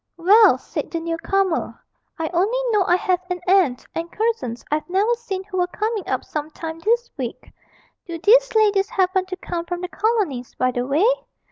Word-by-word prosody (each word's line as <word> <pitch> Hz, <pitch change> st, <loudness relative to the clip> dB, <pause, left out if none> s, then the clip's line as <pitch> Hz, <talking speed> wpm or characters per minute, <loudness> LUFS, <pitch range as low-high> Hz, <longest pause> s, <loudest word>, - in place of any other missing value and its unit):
'Well,' 410 Hz, +6 st, +6 dB
said -, -, -5 dB
the 335 Hz, -, -3 dB
new 330 Hz, 0 st, -3 dB
comer, 390 Hz, -3 st, -1 dB, 0.4 s
'I 325 Hz, -1 st, -2 dB
only 395 Hz, +8 st, +1 dB
know 415 Hz, -3 st, +3 dB
I 350 Hz, -, +5 dB
have 370 Hz, -2 st, +1 dB
an 360 Hz, 0 st, -2 dB
aunt 360 Hz, -10 st, +3 dB
and 335 Hz, +1 st, -4 dB
cousins 435 Hz, -, -2 dB
I've 305 Hz, +3 st, -1 dB
never 400 Hz, +6 st, +2 dB
seen 460 Hz, -6 st, -4 dB
who 380 Hz, -1 st, -6 dB
were 355 Hz, -, +2 dB
coming 425 Hz, +2 st, -3 dB
up -, -, -2 dB
some 300 Hz, 0 st, -4 dB
time 320 Hz, +1 st, -7 dB
this 470 Hz, +6 st, 0 dB
week 250 Hz, -4 st, -6 dB, 0.6 s
do 340 Hz, -1 st, -5 dB
these 470 Hz, +8 st, +4 dB
ladies 410 Hz, -2 st, +3 dB
happen 375 Hz, -4 st, +1 dB
to 370 Hz, -, -4 dB
come 350 Hz, -2 st, -4 dB
from 355 Hz, 0 st, -4 dB
the 360 Hz, -, -3 dB
Colonies, 390 Hz, -, -1 dB
by 255 Hz, 0 st, +1 dB
the 245 Hz, 0 st, -2 dB
way?' 300 Hz, +9 st, +2 dB
370 Hz, 195 wpm, -22 LUFS, 330-420 Hz, 0.6 s, Well